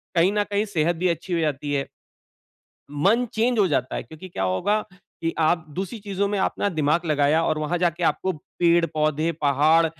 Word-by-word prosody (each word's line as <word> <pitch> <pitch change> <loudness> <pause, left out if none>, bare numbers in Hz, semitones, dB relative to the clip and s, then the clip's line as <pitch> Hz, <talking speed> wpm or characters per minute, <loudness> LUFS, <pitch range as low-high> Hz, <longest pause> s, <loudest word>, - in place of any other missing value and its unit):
कहीं 175 +3 +4
न 210 0 +2
कहीं 205 +1 +1
सेहत 175 -4 0
भी 180 +3 0
अच्छी 175 +2 -3
हो 170 - +1
जाती 145 -2 -1
है। 140 -1 -1 1.0
मन 195 +12 +2
चेंज 235 +2 +1
हो 200 - +5
जाता 130 -5 -1
है - - -3
क्योंकि 160 +4 -11
क्या 170 - -4
होगा 95 - +1
की 170 -3 -6
आप 160 +1 +2
दूसरी 195 +4 -4
चीज़ों 200 -1 -1
में 205 0 -1
अपना 200 +1 0
दिमाग़ 160 0 0
लगाया 150 +1 +2
और 155 - 0
वहाँ 155 +3 -1
जाके 175 0 0
आपको 190 +3 +1
पेड़-पौधे, 160 -1 +1
पहाड़ 155 +3 +4
165 Hz, 185 wpm, -24 LUFS, 155-190 Hz, 1.0 s, हो